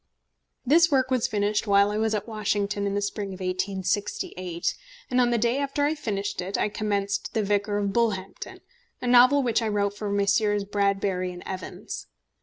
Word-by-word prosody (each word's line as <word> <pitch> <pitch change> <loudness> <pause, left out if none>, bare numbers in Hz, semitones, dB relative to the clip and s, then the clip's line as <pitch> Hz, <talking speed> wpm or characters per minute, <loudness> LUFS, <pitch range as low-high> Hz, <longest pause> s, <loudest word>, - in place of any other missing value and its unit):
This 335 +6 +5
work 260 -3 +2
was 250 -3 +2
finished 210 +1 0
while 200 0 +4
I 210 - -1
was 220 0 +1
at 210 - -3
Washington 205 -2 -1
in 200 - -2
the 205 - 0
spring 200 -1 -3
of - - -13
1868, 185 -1 -2 0.4
and 250 0 +3
on 245 - +3
the 240 - +2
day 235 +4 +1
after 285 +1 0
I 300 - +2
finished 205 - -3
it, 190 +3 -3
I - - +1
commenced 205 0 -2
The 220 - +2
Vicar 205 0 0
of 200 -1 -1
Bullhampton, 200 -5 -2 0.4
a - - -6
novel 250 +3 +6
which 235 -1 +1
I 225 - -1
wrote 205 -1 0
for 205 0 -4
Messrs. 200 +1 +2
Bradbury 195 -3 -1
& - - -14
Evans. 185 -1 -6
205 Hz, 185 wpm, -26 LUFS, 200-230 Hz, 0.4 s, novel